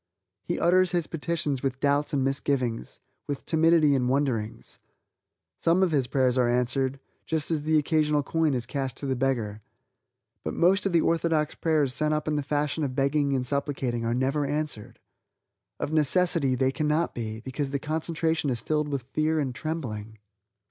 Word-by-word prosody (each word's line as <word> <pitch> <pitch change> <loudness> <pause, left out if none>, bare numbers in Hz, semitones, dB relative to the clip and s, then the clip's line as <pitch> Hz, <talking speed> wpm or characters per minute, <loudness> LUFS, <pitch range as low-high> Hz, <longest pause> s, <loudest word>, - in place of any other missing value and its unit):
He 175 - -3
utters 185 +1 +3
his 175 -2 +1
petitions 155 -4 -2
with 135 -1 -2
doubts 145 +1 +1
and 140 -2 +1
misgivings, 135 -3 -1 0.3
with 145 -2 -4
timidity 160 -2 +4
and 125 -2 +1
wonderings. 125 -6 -2 0.8
Some 170 +3 +3
of 180 - +2
his 135 -5 +1
prayers 130 -1 +2
are 120 -1 +3
answered 130 +2 0 0.3
just 160 0 -1
as 155 -2 0
the 155 +1 +2
occasional 150 -1 +2
coin 160 -1 +1
is 120 -1 -2
cast 135 0 -3
to - - -5
the 135 -1 0
beggar. 120 -5 -1 0.8
But - - -3
most 195 +4 +3
of - - -2
the 170 -1 +4
orthodox 165 -2 +1
prayers 150 -5 +1
sent 155 +3 +1
up 150 - -3
in 155 - +1
the 145 - 0
fashion 145 +2 -1
of 130 -3 -2
begging 140 +1 +1
and 125 -1 -1
supplicating 135 -3 -1
are 115 +1 0
never 135 +4 0
answered. 145 -6 -3 0.8
Of 150 - -3
necessity, 155 -2 +2
they 130 +1 +2
cannot 155 +3 0
be, 110 -2 -5
because 135 +3 -3
the 140 - -1
concentration 160 +1 -1
is 120 -3 -1
filled 150 +5 -1
with 140 -4 -3
fear 155 +1 +1
and 135 -4 -1
trembling. 115 -10 -5
145 Hz, 175 wpm, -27 LUFS, 130-155 Hz, 0.8 s, timidity